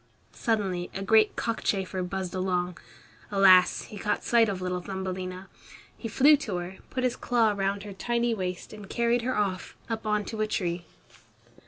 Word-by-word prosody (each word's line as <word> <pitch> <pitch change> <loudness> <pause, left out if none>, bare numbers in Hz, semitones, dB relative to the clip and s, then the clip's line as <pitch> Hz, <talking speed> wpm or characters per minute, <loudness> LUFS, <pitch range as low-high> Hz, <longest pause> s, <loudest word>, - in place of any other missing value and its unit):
Suddenly 195 -6 -1
a 195 - -3
great 215 +1 +4
cockchafer 195 -5 -1
buzzed 185 0 -3
along. 180 -1 -1 0.5
Alas! 190 -2 +6
he 210 - -10
caught 210 - -1
sight 230 -2 +4
of 195 -2 -3
little 180 -1 -2
Thumbelina. 185 0 -5 0.5
He 230 - -6
flew 280 +6 +6
to 215 -9 -4
her, 175 +2 -6
put 255 - -3
his 250 -1 +1
claw 230 -3 +2
round 200 0 -1
her 205 -1 -7
tiny 235 +4 0
waist 185 -3 -4
and 210 -2 -10
carried 235 0 +1
her 255 +2 -1
off, 195 -3 -2 0.2
up 225 -1 -3
on 210 -1 +1
to 220 -1 -4
a 215 - +1
tree. 175 -4 -2
195 Hz, 170 wpm, -27 LUFS, 185-225 Hz, 0.5 s, Alas